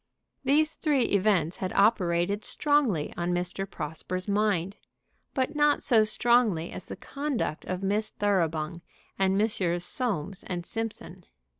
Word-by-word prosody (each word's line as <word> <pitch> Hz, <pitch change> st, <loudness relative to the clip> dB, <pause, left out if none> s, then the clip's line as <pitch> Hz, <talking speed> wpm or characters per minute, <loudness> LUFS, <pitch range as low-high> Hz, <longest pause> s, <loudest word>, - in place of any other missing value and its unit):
These 300 Hz, +4 st, +2 dB
three 290 Hz, -6 st, +2 dB
events 190 Hz, -6 st, +2 dB
had 185 Hz, -1 st, -3 dB
operated 200 Hz, -1 st, +2 dB
strongly 275 Hz, -, +1 dB
on 175 Hz, 0 st, -1 dB
Mr. 180 Hz, +2 st, -3 dB
Prosper's 180 Hz, +4 st, -5 dB
mind; 200 Hz, -2 st, 0 dB, 0.6 s
but 260 Hz, -2 st, 0 dB
not 295 Hz, 0 st, +3 dB
so 230 Hz, -5 st, +5 dB
strongly 215 Hz, -6 st, +2 dB
as -, -, -8 dB
the -, -, -6 dB
conduct 280 Hz, -, -3 dB
of 185 Hz, +1 st, -4 dB
Miss 210 Hz, +3 st, 0 dB
Thoroughbung 170 Hz, -4 st, -1 dB, 0.4 s
and 190 Hz, 0 st, +2 dB
Messrs. 180 Hz, -5 st, 0 dB
Soames 200 Hz, -, -2 dB
& 175 Hz, -, -5 dB
Simpson. 225 Hz, +4 st, -6 dB
200 Hz, 130 wpm, -28 LUFS, 175-230 Hz, 0.6 s, so